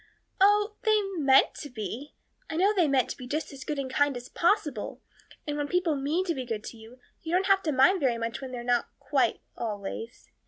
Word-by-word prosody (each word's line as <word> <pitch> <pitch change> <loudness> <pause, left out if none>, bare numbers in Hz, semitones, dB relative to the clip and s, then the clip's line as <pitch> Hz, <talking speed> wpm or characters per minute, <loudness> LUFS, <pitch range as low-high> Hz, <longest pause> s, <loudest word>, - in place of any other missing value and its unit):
"Oh, 415 +2 +4
they 435 -3 +3 0.2
meant 270 -1 +5
to 290 - -7
be 235 +5 -6 0.3
I 320 - -4
know 390 +5 +3
they 360 -6 +3
meant 270 -3 +2
to - - -6
be 250 - -8
just 300 +2 -3
as 265 -1 -8
good 300 - -3
and 275 -1 -2
kind 280 0 +1
as 245 +1 -9
possible. 335 - 0 0.5
And 295 -1 -3
when 290 -1 -1
people 355 -2 +1
mean 295 +7 0
to 345 - 0
be 265 - -4
good 225 -3 -4
to 230 - -8
you, 225 +3 -14 0.2
you 340 +3 +1
don't 385 -6 +2
mind 365 +9 +5
very 255 -6 +1
much 230 +2 -4
when 265 -1 -6
they're 245 -1 -5
not 245 -1 +1
quite - - +1
always. 215 +1 -5
280 Hz, 210 wpm, -28 LUFS, 245-350 Hz, 0.5 s, meant